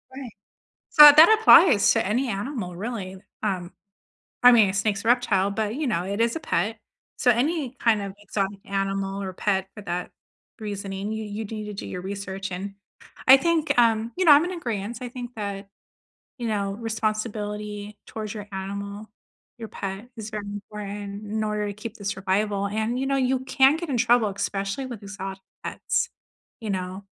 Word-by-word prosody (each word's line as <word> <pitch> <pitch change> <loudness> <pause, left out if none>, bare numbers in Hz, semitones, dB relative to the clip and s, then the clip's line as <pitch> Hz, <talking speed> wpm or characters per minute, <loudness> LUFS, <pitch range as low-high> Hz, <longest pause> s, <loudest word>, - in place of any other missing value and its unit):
Right. 260 -4 -7 0.6
So, 300 - +10
uh, 295 - +12
that 325 +9 +8
applies 345 - +7
to - - +1
any 245 +5 0
animal, 200 -3 -4
really. 195 -3 -5 0.2
Um, 185 -4 -2 0.7
I 250 - +10
mean, 220 -5 +6
a - - -2
snake's 200 0 -1
a - - -4
reptile, 215 -6 +3
but, 215 +2 -2
you 300 -2 -2
know, 175 -6 0
it 200 +4 -2
is 230 +3 +1
a - - -2
pet, 220 - -1 0.4
so, 245 - +4
any 270 +1 0
kind 220 -3 +3
of 200 -1 -5
exotic 200 -1 -3
animal 195 0 -2
or 190 - -4
pet 190 0 0
for 210 - -8
that 180 -1 -4 0.5
reasoning, 200 -1 -5
you 220 0 -4
you 210 +1 -5
do 220 - -7
need 215 0 -5
to 210 - -6
do 195 - -7
your 180 - -5
research, 195 0 -5
and 195 +2 -5 0.5
I 265 +1 +10
think, 325 +2 +1
um, 225 0 +3
you 370 - +1
know, 305 - +8
I'm 290 +3 +6
in 360 -1 -4
agreeance, 225 -3 -4
I 250 - -4
think 245 -1 -7
that, 200 -1 -5 0.7
you 235 - -2
know, 200 -2 -1
responsibility 210 -2 -4
towards 215 -1 -6
your 205 -1 -7
animal, 200 +2 -6 0.5
your 225 - -7
pet 195 +4 -6
is 220 0 -6
very 210 -1 -5
important 205 0 -7
in 215 +1 -2
order 210 -1 -1
to 205 - -4
keep 220 +2 -8
the 200 - -10
survival, 200 +1 0
and 220 +4 -2
you 270 - -1
know, 275 - +1
you 260 0 +1
can 265 +2 +4
get 340 -2 -6
in 255 - 0
trouble, 235 -2 +3
especially 200 +5 -3
with 235 -4 -8
exotic 195 -1 -7 0.2
pets, - - -1 0.5
you 215 - -5
know, 185 +1 -4
210 Hz, 190 wpm, -25 LUFS, 195-235 Hz, 0.7 s, uh